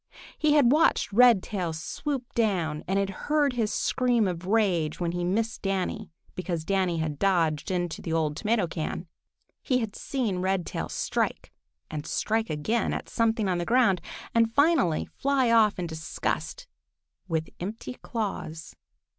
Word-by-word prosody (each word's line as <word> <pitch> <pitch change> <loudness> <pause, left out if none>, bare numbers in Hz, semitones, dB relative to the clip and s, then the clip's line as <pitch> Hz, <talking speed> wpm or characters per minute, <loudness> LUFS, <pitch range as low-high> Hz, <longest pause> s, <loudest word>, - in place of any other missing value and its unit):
He 305 -1 +2
had 280 -5 +5
watched 295 -7 +3
Redtail 205 -7 +4
swoop 260 - -4
down 175 -9 0
and 190 +2 +1
had 195 0 0 0.2
heard 295 -3 +3
his 225 -4 0
scream 245 -4 +1
of 180 0 -4
rage 190 -8 +1
when 170 -2 0
he 175 0 -2
missed 220 +5 -1
Danny 195 +2 -2 0.2
because 175 -3 -3
Danny 190 -3 +1
had 155 -3 -2
dodged 165 -6 +1
into 175 -3 -2
the 165 - -5
old 155 -2 0
tomato 215 +1 +1
can. 165 +1 -4 0.6
He 255 - +1
had 225 -5 -3
seen 230 -9 -2
Redtail 185 -1 -1
strike - - -2 0.4
and 150 +1 -5
strike 220 +4 0
again 185 +10 0
at - - -6
something 225 -2 +1
on 180 -2 0
the - - -1
ground, 230 -3 +3 0.3
and 230 -1 +3
finally 280 - +3
fly 270 -3 +1
off 220 -3 +5
in 180 - -2
disgust 160 -1 -3 0.6
with 160 -1 -2
empty 210 +7 -5
claws. 190 - -5
195 Hz, 150 wpm, -27 LUFS, 170-230 Hz, 0.6 s, had